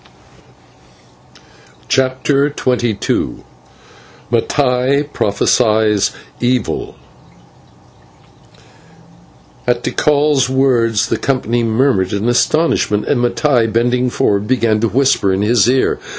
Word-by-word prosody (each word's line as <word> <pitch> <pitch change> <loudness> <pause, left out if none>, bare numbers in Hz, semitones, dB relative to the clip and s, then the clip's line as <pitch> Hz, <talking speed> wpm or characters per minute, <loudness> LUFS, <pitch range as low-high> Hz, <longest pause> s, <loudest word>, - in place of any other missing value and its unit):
CHAPTER 135 +2 +1
XXII 120 -4 -2 0.9
MATTAI 125 +3 +1
PROPHESIES 105 +1 +1 0.3
EVIL 125 -2 -2 2.7
At - - 0
Tikal's 145 -3 +1
words 125 -5 +1
the - - 0
company 120 -3 -1
murmured 115 -4 0
in 100 +3 -2
astonishment, 120 -4 +1
and 130 -4 0
Mattai, 120 -2 +1
bending 125 +2 0
forward, 100 -3 0
began 115 -3 +1
to 115 +1 0
whisper 130 -4 +1
in 95 +2 0
his 115 0 +2
ear. 130 +1 +1
120 Hz, 85 wpm, -15 LUFS, 110-130 Hz, 2.7 s, his